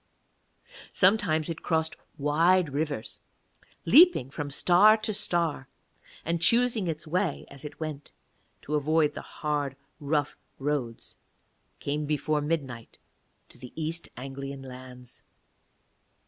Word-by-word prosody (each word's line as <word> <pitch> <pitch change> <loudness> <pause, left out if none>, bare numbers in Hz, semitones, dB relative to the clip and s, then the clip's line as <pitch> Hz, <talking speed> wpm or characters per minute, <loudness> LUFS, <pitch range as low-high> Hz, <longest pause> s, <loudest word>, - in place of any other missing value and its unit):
Sometimes 185 -6 +3
it 165 -1 -4
crossed 160 -1 0 0.2
wide 160 +2 +3
rivers, 145 -5 -3 0.6
leaping 265 - +6
from 145 0 -4
star 185 +9 +5
to 215 0 -3
star; 170 -8 -1 0.6
and, 170 0 -1
choosing 230 +1 +3
its 160 -1 -4
way 175 0 -1
as 140 -1 -10
it 150 -1 -9
went, 155 -3 -6 0.5
to 150 - -5
avoid 150 +1 +2
the - - -6
hard 145 -3 -3 0.2
rough 145 0 -1 0.2
roads, 135 -5 -3 0.6
came 145 +1 -2
before 150 0 0
midnight 140 -7 -4 0.5
to - - -17
the 125 -1 -11
East 165 +1 -4
Anglian 135 +1 -7
lands. 125 -1 -11
150 Hz, 115 wpm, -28 LUFS, 140-170 Hz, 0.6 s, leaping